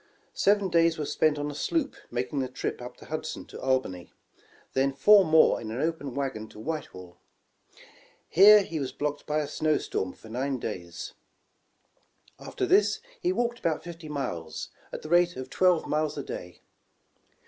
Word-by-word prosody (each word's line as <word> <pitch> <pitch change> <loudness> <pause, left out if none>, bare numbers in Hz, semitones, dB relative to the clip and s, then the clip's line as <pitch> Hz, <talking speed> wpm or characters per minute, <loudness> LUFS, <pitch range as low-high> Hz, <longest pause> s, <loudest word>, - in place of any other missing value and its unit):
Seven 200 -1 +2
days 165 -1 +3
were 150 - -2
spent 155 +1 +2
on 145 0 -3
a - - -8
sloop 290 - -1
making 125 +4 -2
the 130 - -1
trip 125 0 -4
up 125 0 -9
the - - -14
Hudson 155 0 -5
to - - -10
Al 130 0 +4
bany, 90 -8 -9 0.6
then 135 +1 +2
four 200 +9 +7
more 160 -2 +4
in 110 - -6
an 115 +3 -4
open 155 -4 -2
wagon 135 -6 -3
to 105 - -14
Whitehall. 95 - -6 1.1
Here 205 +3 +8
he 165 -4 -4
was 135 -2 -3
blocked 145 +2 -4
by 150 +1 +1
a 145 - -3
snow 155 +1 +1
storm 95 -1 -3
for - - -16
nine 130 +4 -2
days. 90 -7 -6 1.3
After 385 - -3
this 390 +3 +3 0.2
he 360 -4 +1
walked 240 -8 -1
about 160 -2 -1
fifty 165 -2 -9
miles, 105 - -4 0.2
at - - -7
the 155 - -7
rate 175 +1 +4
of 130 0 -7
twelve 180 -3 +3
miles 155 0 -1
a 145 - -3
day. 90 -7 -8
150 Hz, 175 wpm, -28 LUFS, 130-170 Hz, 1.3 s, Here